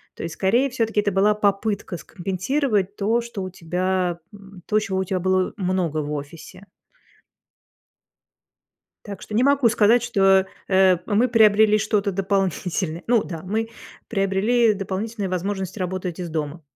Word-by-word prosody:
То - - -7
есть, 165 -1 -5
скорее, 235 +8 +2
всё-таки 225 -4 0
это 205 - -1
была 195 +2 +3
попытка 205 -2 -1
скомпенсировать 200 - -2
то, 220 +4 +1
что 230 -5 -6
у 185 - -5
тебя 180 0 -2
м, 195 -2 -14
то, 215 - +2
чего 195 -3 -2
у - - +1
тебя 185 0 -2
было 185 0 +1
много 185 -5 -1
в 150 0 -5
офисе. 150 +6 -9 2.4
Так 200 -3 -8
что - - -9
не 235 +4 +3
могу 280 -3 +4
сказать, 230 +2 +3
что, 195 -4 +3 0.2
э, 190 -1 +4
мы 225 +4 +2
приобрели 215 -2 +5
что-то 210 -1 0
дополнительное. 185 -3 -1
Ну 235 -2 +3
да, 165 -3 -7
мы 220 +4 -2 0.4
приобрели 210 +3 +2
дополнительную 200 +1 -4
возможность 190 +2 -3
работать 185 -1 -4
из 175 -2 -4
дома. 155 +1 -4
195 Hz, 145 wpm, -22 LUFS, 185-215 Hz, 2.4 s, приобрели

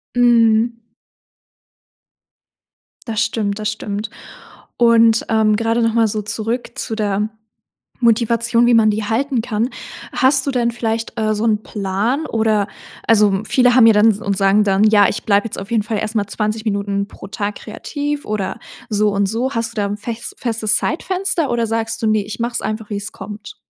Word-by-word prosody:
Mhm. 235 -1 +3 2.3
Das 220 -2 -1
stimmt, 205 -2 -2
das 215 0 -1
stimmt. 210 0 -5 0.7
Und, 230 -1 +4
ähm, 220 -1 +3
grade 230 +1 0
noch 230 -1 +1
mal 230 -1 +3
so 215 0 -2
zurück 225 +4 -3
zu 225 - -4
der 210 0 -1 0.7
Motivation, 235 0 +2
wie 240 - +5
man 220 -1 +5
die 210 0 -2
halten 250 +3 0
kann. 225 +2 -1 0.4
Hast 265 +1 +3
du - - +1
denn 240 -2 +1
vielleicht, 225 -1 -3
äh, 215 0 +1
so 215 +2 -2
'n 215 -1 +1
Plan 210 +9 -2
oder 220 -2 +1 0.4
also, 205 -3 +4
viele 250 +1 +3
haben 235 -3 +7
ja 225 - +7
dann 215 +2 +5
und 200 -1 -1
sagen 195 +2 +4
dann: 195 0 +2
„Ja, 210 -2 +5
ich - - -4
bleibe 205 0 +2
jetzt - - -7
auf 195 +4 -9
jeden 225 -2 +2
Fall 215 0 -3
erst 215 0 -3
mal 205 -2 0
20 215 +1 -2
Minuten 200 -1 -1
pro - - -11
Tag 205 0 -4
kreativ 290 +6 -5
oder 205 -3 -3 0.3
so 210 -1 +2
und 200 0 +1
so.“ 235 +6 -1
Hast 230 0 -2
du - - -24
da - - 0
'n 205 +1 -4
fes 230 +2 -6
festes 225 -3 0
Zeitfenster 360 -1 -1
oder 235 -1 +1
sagst 225 0 -2
du: 220 - +2
„Ne, 215 -1 +2
ich 210 +2 -7
mache 235 +1 -1
es - - -1
einfach, 215 0 -4
wie 205 - -1
es 205 +2 -5
kommt?“ 215 - -9
220 Hz, 185 wpm, -18 LUFS, 210-235 Hz, 2.3 s, haben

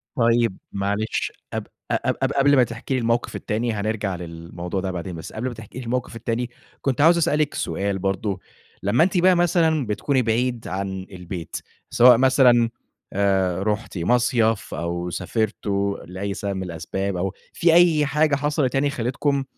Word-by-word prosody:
طيب 115 -4 +2
معلش، 100 +2 -1 0.2
قب - - -3 0.2
ق - - +3
قب - - 0
قب - - -1
قبل 140 +1 +4
ما 125 - +6
تحكي 115 +3 -4
لي 130 - +1
الموقف 115 +1 0
التاني، 115 +2 -1
هنرجع 105 -2 -2
للموضوع 85 +2 -5
ده 95 -1 -2
بعدين، 90 0 -5
بس 80 - -8
قبل 120 +4 -3
ما 125 - -4
تحكي 110 +3 -10
لي 125 - -7
الموقف 125 0 -2
التاني، 115 +1 -2 0.3
كنت 135 0 0
عاوز 170 +2 +6
أسأل 155 -2 +2
لِك 150 -1 +1
سؤال 95 +3 -2
برضه، 95 +1 -1 0.4
لما 115 +11 +4
أنتِ 185 0 +1
بقى 180 +1 +5
مثلًا 160 -5 +2
بتكوني 130 +5 +1
بعيد 120 +1 0
عن 95 0 -4
البيت، 90 -2 -7 0.3
سواء 120 -1 +7
مثلًا 125 -3 +5 0.4
آآ 95 -2 +1
رُحتِ 105 0 -2
مصيف 115 +3 +1
أو 85 +2 -3
سافرتوا 100 -1 -1
لأي 95 +3 -4
سبب 100 -1 -3
من 95 - -3
الأسباب، 90 +3 -3
أو 95 +2 -2 0.2
في 165 -1 +3
أي 165 -4 +5
حاجة 150 +1 +2
حصلت 145 -2 0
يعني 140 +1 +2
خلِّتكم 135 +2 -1
115 Hz, 170 wpm, -23 LUFS, 95-130 Hz, 0.4 s, سواء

